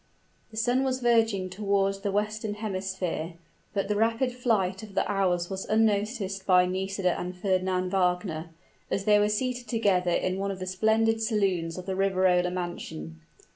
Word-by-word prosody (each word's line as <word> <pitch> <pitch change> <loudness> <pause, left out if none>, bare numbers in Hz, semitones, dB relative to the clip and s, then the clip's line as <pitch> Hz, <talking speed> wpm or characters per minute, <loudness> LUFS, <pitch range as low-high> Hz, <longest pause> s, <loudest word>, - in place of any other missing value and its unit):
The 220 - -12
sun 245 +4 +2
was 260 -1 0
verging 225 -6 +2
toward 195 0 0
the 200 -1 -1
western 210 +1 -1
hemisphere, 190 -5 -3 0.4
but 195 -1 -1
the 210 - 0
rapid 225 +4 +1
flight 225 -7 0
of 210 -3 -11
the - - +1
hours 180 -3 +1
was 190 0 -4
unnoticed 205 -2 0
by 180 -1 +6
Nisida 190 0 -1
and 180 +1 -5
Fernand 185 -1 0
Wagner, 180 -3 0 0.4
as 195 - -1
they 210 -1 +5
were 205 0 +3
seated 245 +3 -2
together 200 -6 +2
in 185 +2 0
one 200 0 -1
of 195 - -3
the 185 - -5
splendid 220 +4 +2
saloons 190 -7 0
of 180 - -6
the 190 - -2
Riverola 185 -2 +2
mansion. 125 - -6
195 Hz, 165 wpm, -27 LUFS, 185-215 Hz, 0.4 s, by